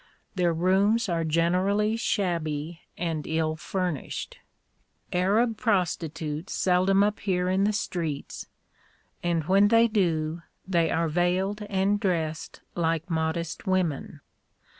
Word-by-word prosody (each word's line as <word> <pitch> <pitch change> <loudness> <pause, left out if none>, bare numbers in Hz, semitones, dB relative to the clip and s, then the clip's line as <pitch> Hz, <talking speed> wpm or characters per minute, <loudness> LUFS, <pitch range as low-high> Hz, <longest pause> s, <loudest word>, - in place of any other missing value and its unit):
Their 180 -3 +2
rooms 195 +7 +2
are 165 -1 0
generally 185 +7 +1
shabby 170 -7 -2 0.2
and 165 -3 -3
ill 160 0 0
furnished. 175 -2 -4 0.7
Arab 210 +6 +2
prostitutes 165 -6 -1
seldom 190 +2 +3
appear 195 -3 0
in 190 +2 +2
the 210 - +2
streets, 170 -8 -4 0.7
and 170 -2 0
when 195 +5 +4
they 230 +2 +5
do, 170 -6 0 0.3
they 170 -3 +2
are 165 0 +1
veiled 180 +5 0
and 195 +1 +1
dressed 160 -5 -2
like 165 0 -1
modest 160 +3 -2
women. 180 -7 -1
180 Hz, 110 wpm, -26 LUFS, 160-195 Hz, 0.7 s, they